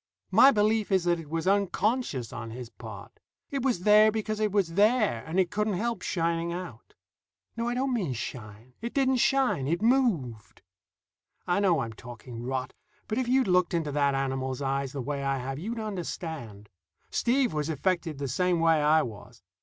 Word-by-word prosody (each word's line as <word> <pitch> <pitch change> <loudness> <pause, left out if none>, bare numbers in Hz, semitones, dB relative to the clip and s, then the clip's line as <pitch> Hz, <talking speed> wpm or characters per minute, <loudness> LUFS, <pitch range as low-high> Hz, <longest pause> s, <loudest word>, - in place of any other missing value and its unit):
My 270 - +8
belief 215 -3 +2
is 190 -2 +3
that 175 -1 +1
it 155 -3 -10
was 165 +1 -2
unconscious 200 - 0
on 115 -1 -6
his 120 0 -8
part. - - -11 0.3
It 275 -1 -1
was 245 -8 0
there 215 +1 +6
because 215 0 -3
it 215 -1 +1
was 190 -5 +1
there, 210 - +3
and 170 +4 0
it 185 -1 +2
couldn't 210 -1 0
help 230 +1 -2
shining 170 -1 -1
out. 170 -10 -8 0.6
No, 230 +1 -2
I 240 - -2
don't 260 +1 0
mean 185 - -1
shine. 115 0 -8
It 235 +1 -5
didn't 265 -2 +3
shine; 255 - +2
it 170 +3 0
moved. 205 - 0 0.8
I 175 +2 +1
know 185 -5 +3
I'm 115 -1 -4
talking 120 0 -10
rot, 130 +1 -3 0.3
but 220 +3 -1
if 255 - -1
you'd 260 -1 +3
looked 180 -1 +2
into 160 -3 -1
that 140 -1 +1
animal's 130 -1 -2
eyes 135 -1 -1
the 135 -3 -5
way 140 +2 -3
I 135 0 0
have, 135 +2 -4
you'd 225 +8 -4
understand. 160 - -6 0.4
Steve 250 - +1
was 150 0 -2
affected 165 0 -1
the 140 0 -3
same 180 +6 +1
way 165 -2 +4
I 155 +1 +4
was. 110 0 -10
170 Hz, 185 wpm, -28 LUFS, 135-215 Hz, 0.8 s, My